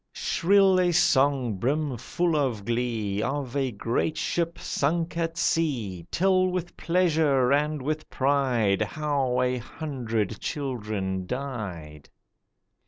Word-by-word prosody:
Shrill 195 Hz, +1 st, +3 dB
a 180 Hz, -1 st, +3 dB
song 135 Hz, -, +3 dB
brim 140 Hz, +5 st, 0 dB
full 170 Hz, +8 st, -1 dB
of 125 Hz, -9 st, -1 dB
glee 115 Hz, -4 st, -1 dB
Of 135 Hz, +1 st, -3 dB
a 135 Hz, -2 st, +1 dB
great 115 Hz, +8 st, -1 dB
ship 170 Hz, 0 st, -1 dB
sunk 165 Hz, +4 st, -1 dB
at 165 Hz, 0 st, -2 dB
sea. 120 Hz, -, -1 dB
Tell 185 Hz, 0 st, +3 dB
with 180 Hz, -1 st, -3 dB
pleasure 155 Hz, -7 st, +2 dB
and 150 Hz, -1 st, 0 dB
with 155 Hz, +2 st, -3 dB
pride 130 Hz, -7 st, +1 dB
How 135 Hz, +1 st, 0 dB
a 125 Hz, 0 st, 0 dB
hundred 115 Hz, -, -3 dB
children 105 Hz, -9 st, -3 dB
died. 95 Hz, -, -6 dB
135 Hz, 115 wpm, -26 LUFS, 115-160 Hz, -, Shrill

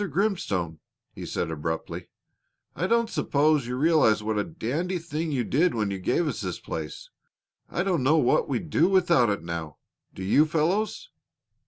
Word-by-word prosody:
Grimstone," 135 Hz, -, -1 dB, 0.3 s
he -, -, -7 dB
said 85 Hz, -, -2 dB
abruptly, 80 Hz, +1 st, -4 dB, 0.7 s
"I 185 Hz, -, -1 dB
don't 235 Hz, +2 st, +2 dB
suppose 150 Hz, -, +1 dB
you 125 Hz, -, -3 dB
realize 135 Hz, -7 st, +3 dB
what 110 Hz, -1 st, 0 dB
a -, -, +1 dB
dandy 165 Hz, +4 st, -3 dB
thing 165 Hz, -1 st, -3 dB
you 130 Hz, -4 st, 0 dB
did 155 Hz, +7 st, +2 dB
when 105 Hz, -3 st, 0 dB
you 95 Hz, -, -3 dB
gave 160 Hz, -, +1 dB
us -, -, -3 dB
this -, -, -4 dB
place. -, -, -6 dB, 0.6 s
I 175 Hz, -, -1 dB
don't 180 Hz, -6 st, +1 dB
know 145 Hz, +5 st, +4 dB
what 125 Hz, -6 st, +2 dB
we'd 140 Hz, +4 st, -3 dB
do 165 Hz, -, +4 dB
without 175 Hz, -, +4 dB
it 100 Hz, -, -2 dB
now; 85 Hz, -3 st, -5 dB, 0.4 s
do 95 Hz, -, -6 dB
you, 145 Hz, +11 st, +4 dB
fellows?" 185 Hz, -, 0 dB
150 Hz, 170 wpm, -26 LUFS, 105-175 Hz, 0.7 s, know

